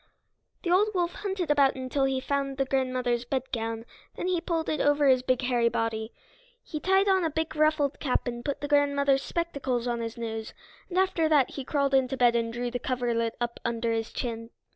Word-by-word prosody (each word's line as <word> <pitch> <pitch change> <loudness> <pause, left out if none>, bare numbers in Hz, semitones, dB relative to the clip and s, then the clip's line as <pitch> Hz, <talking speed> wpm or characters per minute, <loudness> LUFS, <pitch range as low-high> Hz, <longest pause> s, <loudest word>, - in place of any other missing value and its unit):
The 345 - 0
old 390 +4 +5
wolf 350 -1 0
hunted 380 -6 -2
about 280 -2 +4
until 265 +1 -1
he 265 -1 0
found 275 0 -2
the 270 - +1
grandmother's 255 -2 0
bedgown; 235 -3 -3 0.3
then - - -3
he 360 -2 +1
pulled 335 -2 -2
it 305 - 0
on - - +2
over 290 0 +4
his 260 -1 +5
big 255 0 0
hairy 240 -2 +2
body. 225 -1 -2 0.5
He 305 - -5
tied 385 +4 +3
on 380 -2 +3
a 325 - +1
big 320 0 -3
ruffled 305 -2 +2
cap 260 -4 0
and 240 -1 -4
put 285 +1 -3
the 290 - -2
grandmother's 280 -1 +3
spectacles 275 -9 -2
on 240 -1 -1
his 230 0 -5
nose, 225 -1 -5 0.3
and 365 - -4
after 370 -4 +2
that 290 -5 +4
he 275 - -5
crawled 280 0 0
into 265 0 +2
bed 240 -2 +4
and 230 -1 0
drew 240 +1 -3
the 245 - -2
coverlet 235 -3 -1
up 240 -1 -3
under 235 0 -1
his 225 -1 -2
chin. 230 -2 -4
265 Hz, 205 wpm, -27 LUFS, 240-300 Hz, 0.5 s, old